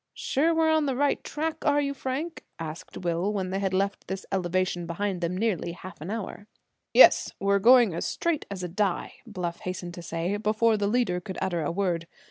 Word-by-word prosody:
"Sure 310 Hz, +5 st, +1 dB
we're 320 Hz, -1 st, +3 dB
on 315 Hz, -2 st, +2 dB
the 265 Hz, -, 0 dB
right 285 Hz, +2 st, +1 dB
track, 315 Hz, +1 st, -3 dB
are 290 Hz, -1 st, +3 dB
you, 280 Hz, -1 st, 0 dB
Frank?" 280 Hz, +5 st, -4 dB
asked 160 Hz, 0 st, -7 dB
Will, 175 Hz, +2 st, -1 dB
when 190 Hz, -3 st, -2 dB
they 195 Hz, -, -1 dB
had 195 Hz, -1 st, 0 dB
left 195 Hz, +2 st, -1 dB
this 190 Hz, 0 st, -5 dB
elevation 180 Hz, -2 st, 0 dB
behind 185 Hz, +2 st, -2 dB
them 175 Hz, +2 st, -1 dB
nearly 190 Hz, -5 st, -1 dB
half 185 Hz, -2 st, -11 dB
an 160 Hz, -, -6 dB
hour. 210 Hz, -1 st, -5 dB, 0.4 s
"Yes, -, -, +7 dB
we're 200 Hz, 0 st, +2 dB
going 240 Hz, -2 st, +6 dB
as 165 Hz, -, -3 dB
straight 335 Hz, -3 st, -1 dB
as 195 Hz, -2 st, -5 dB
a -, -, -2 dB
die," 190 Hz, +1 st, -1 dB
Bluff 180 Hz, -5 st, -4 dB
hastened 180 Hz, -1 st, -5 dB
to 175 Hz, -, -8 dB
say, 170 Hz, +4 st, -2 dB
before 215 Hz, +2 st, +2 dB
the 205 Hz, -1 st, 0 dB
leader 210 Hz, -6 st, +1 dB
could 190 Hz, +1 st, -7 dB
utter 175 Hz, -3 st, -1 dB
a 150 Hz, -, -1 dB
word. 170 Hz, -3 st, -1 dB
195 Hz, 205 wpm, -27 LUFS, 175-235 Hz, 0.4 s, Yes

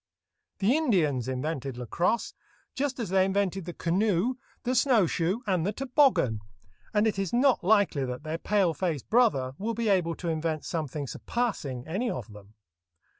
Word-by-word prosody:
The 210 Hz, +7 st, +3 dB
Indians 170 Hz, -, +1 dB
invented 135 Hz, 0 st, -3 dB
lacrosse, 170 Hz, -, -1 dB, 0.4 s
just 275 Hz, -1 st, -2 dB
as 225 Hz, -6 st, -3 dB
they 190 Hz, 0 st, +4 dB
invented 195 Hz, -1 st, 0 dB
the 175 Hz, -, -6 dB
canoe, 190 Hz, +6 st, +1 dB, 0.3 s
the 250 Hz, 0 st, 0 dB
snow 240 Hz, -5 st, +4 dB
shoe, 175 Hz, +8 st, -1 dB
and 185 Hz, -5 st, +1 dB
the 200 Hz, -, 0 dB
toboggan, 255 Hz, -, +2 dB, 0.5 s
and 210 Hz, 0 st, +2 dB
it 210 Hz, -3 st, 0 dB
is 195 Hz, -3 st, -1 dB
not 255 Hz, +2 st, +3 dB
likely 200 Hz, -7 st, +3 dB
that 125 Hz, +2 st, -5 dB
their 160 Hz, +1 st, -4 dB
pale 195 Hz, -4 st, +2 dB
face 160 Hz, -5 st, -2 dB
brother 210 Hz, -, +2 dB
will 225 Hz, +3 st, -2 dB
be 230 Hz, -1 st, 0 dB
able 175 Hz, -4 st, +2 dB
to 175 Hz, -, -6 dB
invent 160 Hz, -1 st, -2 dB
something 150 Hz, -3 st, -3 dB
surpassing 140 Hz, -, -3 dB
any 205 Hz, +10 st, -1 dB
of 115 Hz, -, -5 dB
them. 105 Hz, +1 st, -15 dB
185 Hz, 165 wpm, -28 LUFS, 150-225 Hz, 0.5 s, they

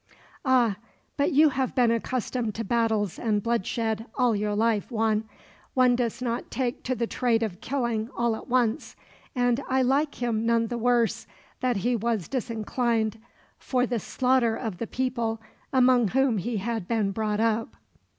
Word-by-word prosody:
"Ah, 245 Hz, -7 st, +3 dB, 0.4 s
but 285 Hz, -, +1 dB
you 305 Hz, +2 st, +6 dB
have 265 Hz, -1 st, -2 dB
been 245 Hz, -2 st, +4 dB
accustomed 230 Hz, -1 st, -2 dB
to 225 Hz, -, -3 dB
battles 220 Hz, -3 st, 0 dB
and 210 Hz, -3 st, 0 dB
bloodshed 225 Hz, 0 st, -1 dB
all 245 Hz, -3 st, +2 dB
your 205 Hz, 0 st, -1 dB
life, 220 Hz, -1 st, +1 dB
Juan. 220 Hz, -2 st, +1 dB, 0.5 s
One 250 Hz, -1 st, +5 dB
does 240 Hz, 0 st, -2 dB
not 235 Hz, -1 st, -2 dB
take 255 Hz, 0 st, -2 dB
to 255 Hz, -, 0 dB
the 235 Hz, -, -1 dB
trade 230 Hz, -1 st, +1 dB
of 190 Hz, -5 st, -4 dB
killing 235 Hz, -4 st, -1 dB
all 235 Hz, -1 st, +1 dB
at -, -, -10 dB
once, 245 Hz, +1 st, 0 dB, 0.4 s
and 245 Hz, +1 st, +2 dB
I 260 Hz, 0 st, +3 dB
like 280 Hz, +4 st, +1 dB
him 230 Hz, -3 st, -1 dB
none 230 Hz, 0 st, +2 dB
the 240 Hz, -, -3 dB
worse 240 Hz, -1 st, +1 dB, 0.3 s
that 250 Hz, -3 st, 0 dB
he 245 Hz, 0 st, +2 dB
was 225 Hz, -4 st, -1 dB
disinclined 230 Hz, -2 st, -1 dB, 0.4 s
for 250 Hz, -1 st, 0 dB
the 240 Hz, -2 st, -1 dB
slaughter 250 Hz, +1 st, +1 dB
of 220 Hz, -7 st, -5 dB
the 230 Hz, -, -3 dB
people 235 Hz, -3 st, -2 dB, 0.3 s
among 255 Hz, -3 st, +4 dB
whom 260 Hz, -1 st, +2 dB
he 230 Hz, +5 st, -2 dB
had 220 Hz, -2 st, -3 dB
been 215 Hz, -3 st, +1 dB
brought 210 Hz, 0 st, -1 dB
up." 225 Hz, 0 st, 0 dB
235 Hz, 165 wpm, -26 LUFS, 220-250 Hz, 0.5 s, you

